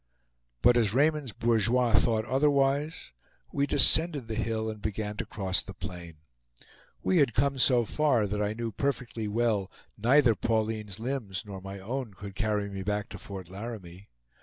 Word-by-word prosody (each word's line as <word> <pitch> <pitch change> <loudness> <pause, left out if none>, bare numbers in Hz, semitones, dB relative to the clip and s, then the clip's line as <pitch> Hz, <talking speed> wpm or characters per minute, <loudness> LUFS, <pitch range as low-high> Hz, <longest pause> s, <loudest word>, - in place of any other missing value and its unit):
But 120 0 +6
as 110 -2 +2
Raymond's 150 -2 +2
bourgeois 115 +2 +2
thought 110 0 +3
otherwise, 140 - +1 0.4
we 140 0 0
descended 155 -4 +4
the 115 - -4
hill 110 0 -2
and 110 -1 -6
began 105 0 -3
to - - -4
cross 95 -3 -1
the 95 - -10
plain. 85 -2 -8 0.9
We 185 - +2
had 135 -6 +2
come 135 +2 +1
so 125 -2 +4
far 135 -5 +2
that 105 +1 -2
I 105 0 0
knew 115 0 -3
perfectly 120 -2 -2
well 105 -3 0 0.3
neither 125 +2 +5
Pauline's 110 -2 -2
limbs 115 -6 -3
nor 100 -2 -8
my 95 +1 -7
own 115 +2 -5
could 100 0 -8
carry 105 +1 -1
me 100 -1 -6
back 105 +1 -2
to - - -9
Fort 95 -3 -8
Laramie. 95 -2 -8
110 Hz, 160 wpm, -28 LUFS, 100-125 Hz, 0.9 s, But